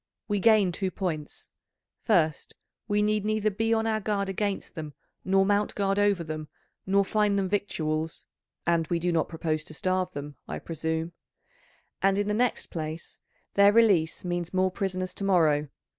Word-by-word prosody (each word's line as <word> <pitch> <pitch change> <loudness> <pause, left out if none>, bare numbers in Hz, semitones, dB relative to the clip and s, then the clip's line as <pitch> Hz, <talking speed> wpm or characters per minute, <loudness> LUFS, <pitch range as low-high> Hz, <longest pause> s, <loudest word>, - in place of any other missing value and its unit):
We 205 -1 0
gain 210 -3 +5
two 190 +2 -2
points; 165 -5 -5 0.5
first, 165 - +1 0.3
we 210 -1 +2
need 210 -1 +1
neither 215 0 +1
be 225 +3 -1
on 225 0 +2
our 220 -1 +1
guard 200 -1 -1
against 200 +1 -2
them 155 -3 -7 0.3
nor 195 +1 +3
mount 205 +1 +1
guard 195 0 +1
over 205 -4 +2
them 155 -1 -5 0.4
nor 200 +1 +3
find 210 0 +2
them 195 -1 +1
victuals 160 -5 -2 0.4
(and 170 -1 +2
we 175 - 0
do 175 +1 0
not 165 -2 +1
propose 160 -2 -2
to 155 - -10
starve 185 +3 -1
them, 145 0 -7
I - - -4
presume), 160 +1 -3 0.9
and 195 0 +3
in 205 0 0
the 210 - 0
next 245 +3 0
place, 160 0 -6 0.3
their 200 0 +6
release 200 -8 +3
means 175 0 -3
more 185 0 +2
prisoners 185 -1 -2
to - - -5
morrow. 155 -6 +3
190 Hz, 170 wpm, -27 LUFS, 160-205 Hz, 0.9 s, their